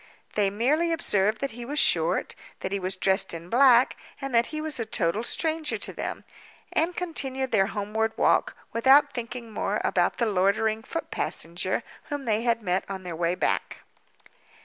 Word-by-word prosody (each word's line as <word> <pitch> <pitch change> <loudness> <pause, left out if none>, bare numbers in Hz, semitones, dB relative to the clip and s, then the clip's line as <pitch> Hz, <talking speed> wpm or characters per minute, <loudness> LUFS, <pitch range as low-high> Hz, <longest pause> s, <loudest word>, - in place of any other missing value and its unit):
They 205 -2 +2
merely 285 +12 +1
observed 215 -10 +1
that 275 - -2
he 240 +2 -8
was 285 +5 -5
short, 170 - +3 0.3
that 190 - -3
he 200 - -1
was 185 +1 -1
dressed 190 -1 +1
in 165 +1 -9
black, 250 -1 +5 0.2
and 275 -2 -5
that 235 0 +4
he 310 - -5
was 310 -3 -3
a - - 0
total 195 +1 0
stranger 315 +3 0
to - - -1
them—and 335 +2 -4
continued 265 -7 -2
their 195 -4 +3
homeward 220 +1 -2
walk, - - +2 0.2
without 275 +5 +5
thinking 235 -1 -5
more 205 0 -1
about 175 -1 +1
the 235 - +1
loitering 215 +2 +1
foot 330 +8 -6
passenger 175 +3 -2 0.2
whom 290 -2 -5
they 220 -1 +1
had 230 -1 0
met 185 0 0
on 190 -1 -5
their 175 -2 -5
way 170 +1 0
back. - - -1
225 Hz, 170 wpm, -26 LUFS, 195-270 Hz, 0.3 s, black